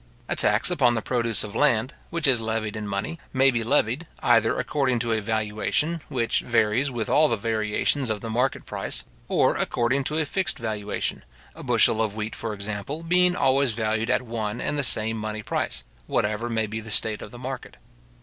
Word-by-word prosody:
A - - 0
tax 105 +11 +3
upon 125 -8 +3
the 110 - -1
produce 115 -4 +1
of 105 -2 -7
land, 125 -4 +2 0.2
which 170 -1 -2
is 130 -5 +3
levied 110 -1 -2
in 105 -1 -4
money, 105 +12 -3
may 135 0 +5
be 115 -2 -1
levied, 135 +4 +1 0.2
either 115 0 +4
according 135 -4 0
to 115 0 -1
a 110 - 0
valuation, 110 +9 -1
which 120 -3 +1
varies 120 +3 +2
with 120 -4 -3
all 155 +1 +4
the 115 - +1
variations 110 +4 0
of 110 -1 -1
the 115 - -6
market 125 +4 0
price; - - -4 0.2
or - - +3
according 125 +4 0
to 155 - -1
a 160 - +1
fixed 190 +6 -1
valuation, 105 - -3 0.3
a 165 - -11
bushel 115 -4 +3
of 110 -2 -1
wheat, 110 0 -4
for 110 -2 -4
example, 105 +10 -5
being 180 +1 +3
always 135 -4 +2
valued 110 +1 -1
at 130 - +2
one 110 -3 -3
and - - -2
the 145 - 0
same 110 -2 +3
money 110 0 -4
price, - - -2 0.2
whatever 105 +3 0
may 110 -1 0
be 110 +1 -4
the 110 0 -9
state 110 0 +2
of - - -8
the 120 - -11
market. 130 +1 -7
115 Hz, 195 wpm, -25 LUFS, 110-135 Hz, 0.3 s, may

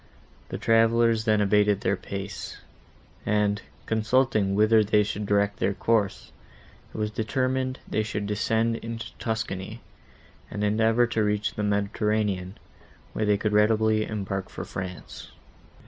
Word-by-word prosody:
The - - -4
travellers 115 0 +3
then 110 -2 +3
abated 105 0 +3
their 100 - +1
pace, 100 +1 -6 0.7
and, 105 0 +1 0.2
consulting 110 -3 +1
whither 110 +1 +5
they 105 0 +3
should 105 0 -4
direct 100 0 +1
their 100 - 0
course, 110 -4 0 0.6
it - - -9
was 105 0 -1
determined 130 +4 -1
they 110 - 0
should 105 -1 -3
descend 110 +2 0
into 115 0 -7
Tuscany, 110 -1 -3 0.7
and 105 - -4
endeavour 110 +3 +3
to 115 -2 0
reach 105 0 0
the - - -4
Mediterranean, 105 -2 0 0.6
where 110 - -1
they 105 -1 +3
could 105 +1 -1
readily 110 0 +3
embark 95 -3 -4
for - - -7
France. 90 -1 -7
105 Hz, 130 wpm, -26 LUFS, 100-110 Hz, 0.7 s, whither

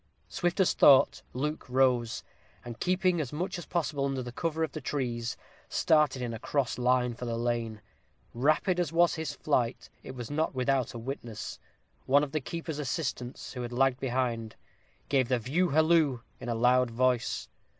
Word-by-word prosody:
Swift 175 +1 -1
as 190 - +4
thought, 135 -2 +6
Luke 150 +2 -3
arose, 125 -3 +2 0.4
and 120 -1 -7
keeping 180 -2 +2
as 135 - -4
much 175 +4 -3
as 175 - -9
possible 150 -5 -1
under 135 -2 -2
cover 160 +4 -1
of 160 - -2
the 155 - -6
trees, 125 -4 -2 0.3
started 150 -5 +2
in 120 -1 -3
a 115 - -6
cross 135 -1 -1
line 125 0 +2
for 125 +1 -7
the 115 -1 -2
lane. 115 -2 -2 0.5
Rapid 155 - +2
as 170 -4 0
was 170 +1 +4
his 160 -3 -4
flight, 120 0 -1
it 130 - -9
was 120 -1 -6
not 155 -1 0
without 130 -1 0
a - - -3
witness: 115 -2 -6 0.5
one 140 +2 +5
of 145 - -3
the 155 - -1
keeper's 160 +1 -5
assistants, 130 -3 -4
who 125 - -5
had 120 0 -5
lagged 130 +1 +2
behind, 120 -4 -2 0.5
gave 130 -3 +2
the 125 0 +2
view 145 +11 0
halloo 155 -4 +3 0.2
in 120 - -6
a 120 - 0
loud 125 +2 +3
voice. 125 +1 0
130 Hz, 175 wpm, -29 LUFS, 120-155 Hz, 0.5 s, thought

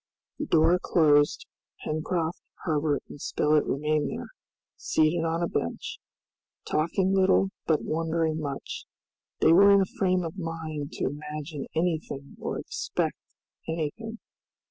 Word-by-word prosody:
The 300 - -2
door 165 +2 +4
closed, 150 - +3 0.4
Pencroft, 160 +2 -1 0.2
Herbert 150 -3 +1
and 145 - -11
Spilett 150 0 +2
remained 150 +1 0
there, - - -6 0.5
seated 160 +2 +2
on 165 +1 0
a - - +1
bench, 85 - -3 0.7
talking 185 +5 +1
little 190 0 +4 0.2
but 160 -2 +2
wondering 160 0 0
much. 140 -3 -5 0.6
They 160 - +6
were 200 +4 +8
in 200 -1 +7
a 190 - -3
frame 185 -2 +2
of 165 +3 -5
mind 160 -3 -4
to - - -2
imagine 150 +1 -5
anything 160 -4 -2
or - - -3
expect - - -2 0.5
anything. 165 +8 -3
160 Hz, 125 wpm, -27 LUFS, 150-175 Hz, 0.7 s, were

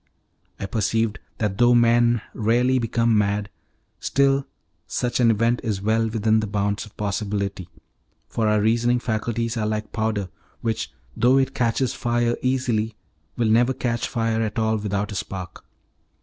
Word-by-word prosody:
I - - -3
perceived 110 +1 0 0.2
that 105 -3 -2
though 120 0 +6
men 120 -1 +4
rarely 120 +4 +2
become 115 -1 +1
mad, 105 0 0 0.5
still 140 0 +2 0.4
such 125 0 -1
an 120 -2 +5
event 115 +2 +2
is 110 -5 -1
well 110 +2 +1
within 110 0 +2
the 110 - -2
bounds 100 0 -1
of 105 - -20
possibility, 100 -3 -2 0.6
for 110 -2 -1
our 105 0 +3
reasoning 120 +3 +2
faculties 115 0 -2
are 110 -1 0
like 110 0 -3
powder, 110 -4 -1 0.3
which, 115 -1 -2 0.2
though 125 +3 +4
it 135 0 +1
catches 120 +1 0
fire 120 0 0
easily, 125 -4 0 0.4
will 115 -2 +2
never 120 +4 +4
catch 120 -2 -1
fire 115 -1 0
at 110 0 -2
all 110 0 +1
without 105 0 -2
a - - -5
spark. 95 -2 -6
115 Hz, 150 wpm, -23 LUFS, 105-120 Hz, 0.6 s, though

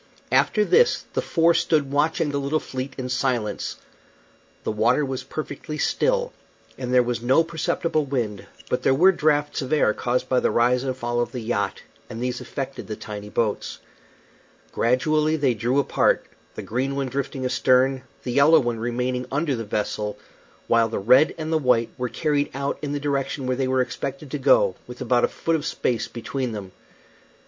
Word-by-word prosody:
After 210 -2 +3
this 480 - +3
the - - 0
four 165 0 +3
stood 150 -4 +1
watching 150 +1 +1
the 140 - -1
little 140 +3 0
fleet 130 -1 -6
in 130 -1 -4
silence. 125 -4 -1 0.9
The - - -1
water 115 +7 +2
was 130 -1 -3
perfectly 150 +2 -6
still, - - +1 0.4
and 125 -1 -5
there 125 -1 +5
was 120 -1 -2
no 130 +7 +4
perceptible 165 -1 -1
wind, 115 -7 -3 0.2
but 125 - -1
there 135 - +3
were 180 +7 +6
draughts 150 -4 +1
of 130 +1 -5
air 150 -8 +3
caused 125 +1 -1
by 130 - +2
the - - +1
rise 125 +2 +2
and 130 -1 -3
fall 120 -1 -2
of 120 - -1
the 125 - -5
yacht, 110 -3 -2 0.3
and 115 - -7
these 125 0 -2
affected 135 -1 -6
the 110 - -4
tiny 105 -1 -8
boats. 110 -1 -1 0.9
Gradually 155 +6 +2
they 140 -5 +2
drew 120 +5 0
apart, 140 - +2 0.3
the - - -6
green 130 +4 -2
one 140 -1 -1
drifting 135 0 -3
astern, 130 +1 +3 0.2
the 125 - -3
yellow 140 +6 +6
one 120 -2 -2
remaining 125 +2 -2
under 140 0 0
the 115 - -4
vessel, 105 0 -2 0.5
while 115 -1 +3
the 110 - -3
red 125 +9 +4
and 160 0 -3
the 160 - +3
white 125 -4 +2
were 125 -1 -3
carried 145 0 0
out 140 +1 -2
in 145 - -3
the 145 - -2
direction 140 -1 -2
where 130 0 0
they 135 -1 0
were 130 0 +2
expected 135 +3 -5
to - - -3
go, - - +4
with - - -10
about - - +2
a - - -1
foot 165 - -1
of 155 - -2
space 125 -6 -1
between 125 +1 -4
them. 100 -3 -7
130 Hz, 185 wpm, -24 LUFS, 120-150 Hz, 0.9 s, were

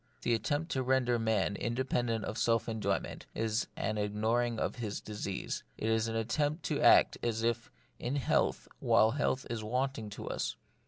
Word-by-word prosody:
The 120 - +2
attempt 145 +9 -1
to 130 - +1
render 125 -2 +2
man 110 -3 +1
independent 120 -2 -1
of 110 - -4
self 115 -1 +2
enjoyment 110 -2 -2
is 110 0 0
an 105 +1 -1
ignoring 110 +3 +1
of - - -2
his 110 -4 -3
disease; 105 -2 -4
it 110 - -1
is 110 0 +2
an 115 - -3
attempt 145 +8 0
to - - -1
act - - +6
as 115 -1 -1
if 115 0 0 0.3
in 125 +4 -2
health 140 - +1
while 110 +1 +4
health 135 0 0
is 115 -2 -3
wanting 125 -1 -1
to - - -7
us. - - -2
115 Hz, 170 wpm, -32 LUFS, 110-125 Hz, 0.3 s, act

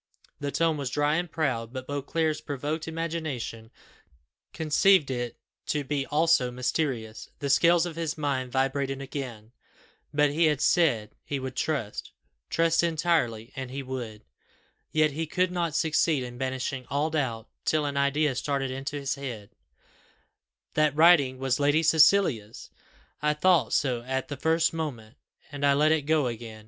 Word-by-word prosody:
The 145 - -3
tone 165 0 +1
was 140 -3 -3
dry 145 +3 +1
and 175 -1 -3
proud, 125 -8 -1
but 130 0 -6
Beauclerc's 150 +3 -1
provoked 150 +3 -4
imagination 155 -9 -4 0.8
conceived 160 0 +3
it 120 -2 -3 0.3
to 150 -1 0
be 140 0 -2
also 155 -4 +3
mysterious; 125 -3 -3
the 140 -1 -1
scales 170 +4 +4
of 170 -2 -6
his 165 -1 -3
mind 135 -4 -2
vibrated 135 +1 0
again, 130 -5 -7 0.6
but 150 -1 +3
he 165 +3 +2
had 150 -3 +2
said 150 -9 +2
he 140 - -3
would 130 -1 -6
trust 135 -11 -3 0.4
trust 165 0 +2
entirely, 155 -9 0
and 130 -1 -5
he 135 +2 -5
would: 120 -5 -6 0.7
yet 155 -1 +3
he 160 +3 -3
could 180 +3 0
not 170 -3 -1
succeed 160 -3 +2
in 120 0 -8
banishing 130 0 -3
all 145 +3 0
doubt, 125 -7 -2 0.2
till 155 -1 +1
an 140 -1 -3
idea 140 +1 +2
started 135 0 -2
into 135 +3 -5
his 140 -1 -2
head 125 -7 -7 1.2
"That 150 -2 +2
writing 155 -5 +5
was 130 0 0
Lady 145 +3 +3
Cecilia's! 155 - +3 0.5
I 150 0 +1
thought 180 +2 +3
so 125 -4 +1
at 130 +2 -3
the 145 - -3
first 160 +4 +2
moment, 135 -8 -5 0.3
and 145 -1 -6
I 140 0 +4
let 150 +2 +4
it 155 -3 +1
go 155 -3 +3
again. 115 -2 -5
145 Hz, 155 wpm, -27 LUFS, 130-160 Hz, 1.2 s, writing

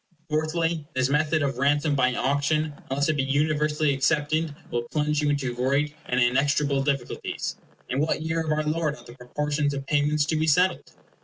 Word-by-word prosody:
Fourthly, 155 0 0
this 130 0 +2
method 155 +1 +2
of 135 -3 -2
ransom 145 +2 +2
by 130 -2 +2
auction, 145 +3 0 0.2
unless 140 +2 +1
it 155 -1 +1
be - - +2
universally 150 +1 +1
accepted, 150 +2 0 0.2
will 120 0 -2
plunge 150 0 0
you 150 - +1
into 140 -4 -1
great 140 +4 0
and 125 - +1
inextricable 140 +3 +2
difficulties. 135 -3 -3 0.3
In 130 - -2
what 155 +1 0
year 160 +1 -1
of 155 - -2
our 155 0 +1
Lord 155 0 -1
are - - -16
the 120 - -11
proportions 145 +3 -2
of 135 -1 -5
payments 150 +1 +2
to 160 - -1
be 155 +1 +1
settled? 180 +5 +2
145 Hz, 180 wpm, -25 LUFS, 140-155 Hz, 0.3 s, this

